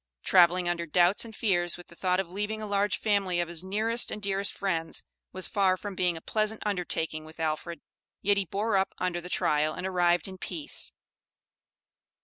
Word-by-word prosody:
Traveling 180 Hz, 0 st, +5 dB
under 170 Hz, -1 st, -1 dB
doubts 175 Hz, +7 st, +4 dB
and 225 Hz, -1 st, -10 dB
fears 175 Hz, -6 st, +1 dB
with 175 Hz, -, -13 dB
the 170 Hz, -, -14 dB
thought 180 Hz, +1 st, +1 dB
of 190 Hz, -, -1 dB
leaving 210 Hz, +4 st, -3 dB
a 215 Hz, -, -4 dB
large 205 Hz, 0 st, +1 dB
family 200 Hz, -4 st, +1 dB
of 175 Hz, -, 0 dB
his 170 Hz, 0 st, -2 dB
nearest 220 Hz, +5 st, +1 dB
and -, -, -4 dB
dearest 200 Hz, 0 st, 0 dB
friends, 170 Hz, -5 st, -2 dB, 0.3 s
was 185 Hz, 0 st, 0 dB
far 190 Hz, -2 st, +2 dB
from 205 Hz, +1 st, -6 dB
being 180 Hz, -2 st, +1 dB
a -, -, -9 dB
pleasant 215 Hz, +3 st, -1 dB
undertaking 170 Hz, -5 st, -2 dB
with 160 Hz, +1 st, -14 dB
Alfred, 160 Hz, +2 st, -2 dB, 0.4 s
yet 205 Hz, +1 st, +4 dB
he 200 Hz, -, +1 dB
bore 200 Hz, +4 st, 0 dB
up 190 Hz, -, 0 dB
under 180 Hz, -1 st, -1 dB
the 180 Hz, -, -8 dB
trial 155 Hz, -2 st, +1 dB
and -, -, -5 dB
arrived 175 Hz, -1 st, +2 dB
in 190 Hz, -1 st, -9 dB
peace. 300 Hz, -, -2 dB
185 Hz, 190 wpm, -28 LUFS, 175-205 Hz, 0.4 s, Traveling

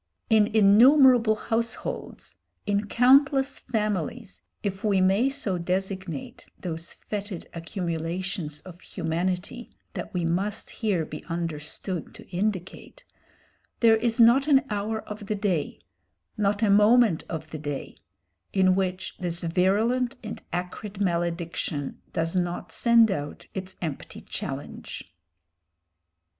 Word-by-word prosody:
In 215 Hz, -2 st, +6 dB
innumerable 230 Hz, +2 st, +6 dB
households, 230 Hz, +1 st, -3 dB, 0.3 s
in 205 Hz, 0 st, 0 dB
countless 270 Hz, +3 st, +4 dB
families, 205 Hz, -, -3 dB, 0.2 s
if 195 Hz, -1 st, -3 dB
we 205 Hz, -3 st, +3 dB
may 195 Hz, +8 st, +3 dB
so 220 Hz, -10 st, -2 dB
designate 185 Hz, -3 st, -4 dB
those 165 Hz, -2 st, -5 dB
fetid 205 Hz, -3 st, -6 dB
accumulations 170 Hz, -2 st, -3 dB
of 180 Hz, -1 st, -12 dB
humanity 180 Hz, +7 st, -3 dB, 0.2 s
that -, -, -5 dB
we 175 Hz, -2 st, -1 dB
must 195 Hz, +5 st, -1 dB
here 200 Hz, -8 st, 0 dB
be 150 Hz, -, -8 dB
understood 165 Hz, +1 st, -4 dB
to -, -, -13 dB
indicate, 190 Hz, 0 st, -3 dB, 0.8 s
there 225 Hz, -1 st, +6 dB
is 230 Hz, +1 st, 0 dB
not 240 Hz, +5 st, +6 dB
an 275 Hz, -2 st, +5 dB
hour 210 Hz, +2 st, -2 dB
of 210 Hz, -1 st, -8 dB
the 215 Hz, -, 0 dB
day 190 Hz, -7 st, -1 dB, 0.6 s
not 205 Hz, 0 st, +1 dB
a 205 Hz, -, +4 dB
moment 210 Hz, -2 st, +5 dB
of 160 Hz, -1 st, -5 dB
the 155 Hz, -, -5 dB
day 145 Hz, -2 st, -5 dB, 0.6 s
in 185 Hz, -1 st, +4 dB
which 185 Hz, 0 st, -2 dB
this 170 Hz, -1 st, -3 dB
virulent 210 Hz, +9 st, +2 dB
and 215 Hz, -, -6 dB
acrid 190 Hz, +3 st, -5 dB
malediction 170 Hz, -5 st, -2 dB
does 165 Hz, +2 st, -1 dB
not 175 Hz, -1 st, -2 dB
send 235 Hz, -2 st, +5 dB
out 145 Hz, -4 st, -4 dB
its 190 Hz, 0 st, -5 dB
empty 155 Hz, -5 st, -5 dB
challenge. -, -, -7 dB
195 Hz, 120 wpm, -26 LUFS, 170-220 Hz, 0.8 s, In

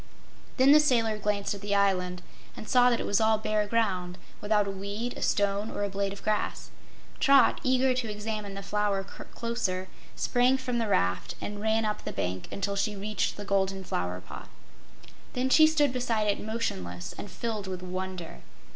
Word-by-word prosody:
Then 265 Hz, +1 st, +6 dB
the 300 Hz, -, +9 dB
sailor 230 Hz, -7 st, +2 dB
glanced 205 Hz, -1 st, -1 dB
at 200 Hz, -, -8 dB
the 205 Hz, 0 st, -1 dB
island 180 Hz, -3 st, +1 dB, 0.3 s
and 215 Hz, -, -8 dB
saw 250 Hz, -1 st, +5 dB
that 235 Hz, -, +1 dB
it -, -, -2 dB
was 205 Hz, -, +2 dB
all 220 Hz, 0 st, +4 dB
bare 215 Hz, -1 st, 0 dB
ground, 185 Hz, -5 st, 0 dB, 0.2 s
without 210 Hz, 0 st, +2 dB
a -, -, -2 dB
weed, 200 Hz, +5 st, -4 dB
a -, -, -8 dB
stone 205 Hz, +1 st, +1 dB
or 205 Hz, -, -3 dB
a 200 Hz, -, -1 dB
blade 195 Hz, 0 st, -2 dB
of 200 Hz, -, -9 dB
grass. 215 Hz, -1 st, -2 dB, 0.5 s
Trot, 275 Hz, -4 st, +5 dB
eager 260 Hz, 0 st, +3 dB
to 250 Hz, -3 st, -2 dB
examine 210 Hz, -1 st, -4 dB
the 195 Hz, -, -6 dB
Flower 205 Hz, -1 st, 0 dB
closer, 190 Hz, -2 st, -4 dB, 0.3 s
sprang 250 Hz, +2 st, +2 dB
from 250 Hz, -2 st, -2 dB
the 225 Hz, -, 0 dB
raft 90 Hz, -, 0 dB
and 205 Hz, 0 st, -5 dB
ran 220 Hz, +1 st, +1 dB
up 210 Hz, 0 st, -2 dB
the -, -, -4 dB
bank 90 Hz, +1 st, -3 dB
until 200 Hz, 0 st, -2 dB
she 210 Hz, +1 st, 0 dB
reached 210 Hz, +2 st, -2 dB
the 205 Hz, -, -6 dB
Golden 195 Hz, -1 st, 0 dB
Flower 90 Hz, -, -3 dB
pot. 90 Hz, -, -10 dB, 0.8 s
Then 255 Hz, +1 st, 0 dB
she 315 Hz, +2 st, +8 dB
stood 295 Hz, -4 st, +2 dB
beside 235 Hz, -4 st, 0 dB
it 205 Hz, -1 st, 0 dB
motionless 95 Hz, -, -4 dB
and 205 Hz, -, -7 dB
filled 215 Hz, 0 st, -4 dB
with 185 Hz, -1 st, -5 dB
wonder. 185 Hz, -, -5 dB
205 Hz, 185 wpm, -28 LUFS, 195-230 Hz, 0.8 s, the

